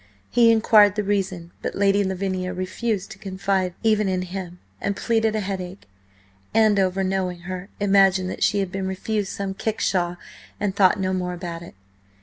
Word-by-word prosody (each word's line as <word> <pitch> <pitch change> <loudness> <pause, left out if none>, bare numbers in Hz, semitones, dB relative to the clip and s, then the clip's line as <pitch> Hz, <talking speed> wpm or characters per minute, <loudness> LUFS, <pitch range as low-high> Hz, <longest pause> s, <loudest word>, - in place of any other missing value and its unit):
He 235 -1 +5
inquired 215 -3 +5
the 210 - 0
reason, 190 -4 -2
but - - -4
Lady 200 0 +3
Lavinia 185 -1 -2
refused 190 +2 -3
to - - -11
confide 190 -2 -1
even 215 -2 +3
in 185 -1 -1
him, 180 -1 -6 0.2
and 200 0 -1
pleaded 225 0 +1
a 215 - 0
headache. 190 - -5 0.7
Andover, 195 -4 +3
knowing 185 -2 -2
her, 185 +2 -6
imagined 195 -2 +4
that - - -7
she 205 - +3
had 190 -2 -3
been 190 0 -3
refused 200 +1 -2
some 195 -1 -3
kickshaw, 190 -4 -1 0.4
and 205 -2 -1
thought 195 0 +4
no 190 0 0
more 180 -1 -2
about 170 -1 -6
it. 170 - -12
190 Hz, 165 wpm, -23 LUFS, 185-205 Hz, 0.7 s, He